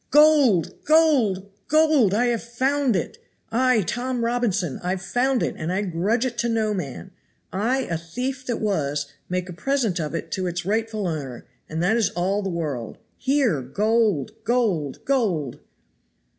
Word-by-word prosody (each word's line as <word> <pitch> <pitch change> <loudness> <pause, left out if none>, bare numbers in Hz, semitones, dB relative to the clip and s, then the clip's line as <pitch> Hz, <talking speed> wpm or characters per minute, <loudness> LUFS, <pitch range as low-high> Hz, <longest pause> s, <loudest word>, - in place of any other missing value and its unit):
GOLD! 290 - +4
GOLD! 275 - +3 0.2
GOLD! 305 -10 +4
I 240 +3 +3
have 235 -2 0
found 260 +1 0
it. 180 - -3 0.3
I, 250 -1 +3
Tom 245 +5 -2
Robinson, 210 - 0
I've 180 +1 -2
found 245 +7 +1
it, - - -1
and 155 +2 -3
I 195 +3 0
grudge 200 +7 0
it 240 -2 -4
to 235 - +1
no 220 -2 +1
man. 135 - -5 0.4
I, 235 +8 +1
a 170 -10 -3
thief 255 +11 -4
that 240 -2 -1
was, 145 -8 -1 0.2
make 180 0 -2
a 180 - -7
present 225 -2 0
of 155 0 -3
it 165 0 -5
to 185 -1 -1
its 175 0 -3
rightful 215 0 -1
owner, 140 -7 -5 0.2
and 160 +1 -2
that 215 +6 +3
is 220 -4 +2
all 190 +4 0
the 195 - -3
world. 150 - -4 0.2
Here 260 - +1
GOLD! 215 - 0
GOLD! 210 - 0
GOLD!" 190 - 0
210 Hz, 160 wpm, -24 LUFS, 175-245 Hz, 0.4 s, GOLD